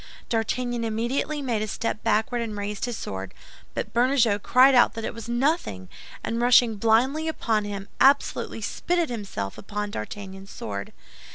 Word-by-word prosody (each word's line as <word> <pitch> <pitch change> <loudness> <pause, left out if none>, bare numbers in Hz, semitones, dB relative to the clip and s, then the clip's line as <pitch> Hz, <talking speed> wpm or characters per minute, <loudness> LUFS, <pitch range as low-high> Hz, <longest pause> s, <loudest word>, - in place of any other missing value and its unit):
D'Artagnan 240 +1 -1
immediately 240 +7 -1
made 235 -5 0
a 215 - -2
step 215 +1 -3
backward 230 +2 +1
and 220 -3 -4
raised 205 +1 -3
his 245 -2 -4
sword; 95 0 -6 0.4
but - - -4
Bernajoux 240 -4 +3
cried 260 +5 +6
out 245 -2 +5
that 225 - -4
it - - -3
was 230 0 -8
nothing, 240 - 0 0.3
and 230 +1 -2
rushing 240 -2 +5
blindly 250 +9 +2
upon 220 -9 0
him, 200 -1 -5
absolutely 275 -4 +3
spitted 340 +9 -1
himself 195 - -5
upon 210 0 -4
D'Artagnan's 195 - -7
sword. 100 - -6
225 Hz, 155 wpm, -25 LUFS, 205-250 Hz, 0.4 s, cried